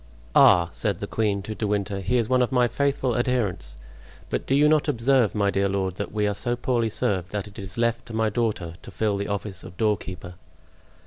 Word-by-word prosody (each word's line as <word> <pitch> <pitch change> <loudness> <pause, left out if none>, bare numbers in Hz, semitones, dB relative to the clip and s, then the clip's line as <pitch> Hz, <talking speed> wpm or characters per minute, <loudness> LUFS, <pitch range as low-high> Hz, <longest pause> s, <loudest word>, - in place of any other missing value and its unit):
"Ah!" 85 -1 +6
said 100 -2 -2
the 100 - -4
queen 100 -2 -1
to 110 - -5
De 105 +1 -3
Winter, 100 -1 -1
"he 120 +6 0
is 115 -3 +1
one 130 +1 +3
of 125 - +1
my 125 -2 +3
faithful 135 0 0
adherents; 120 - -1 0.5
but - - -2
do 135 - +2
you 145 +2 +5
not 155 0 +3
observe, 125 -4 +2
my 100 -1 +2
dear 100 0 +1
lord, 95 -1 -2
that 100 - -4
we 105 0 0
are 105 - 0
so 120 +4 -1
poorly 120 -2 0
served 95 -4 -1
that 105 -1 -3
it 100 - -12
is 95 0 -8
left 115 0 0
to 115 - -8
my 110 0 +2
daughter 105 -7 -1
to - - -11
fill 105 -2 -1
the 100 0 -3
office 100 -2 -4
of 85 - -11
doorkeeper?" 95 -5 -2
105 Hz, 220 wpm, -25 LUFS, 100-120 Hz, 0.5 s, Ah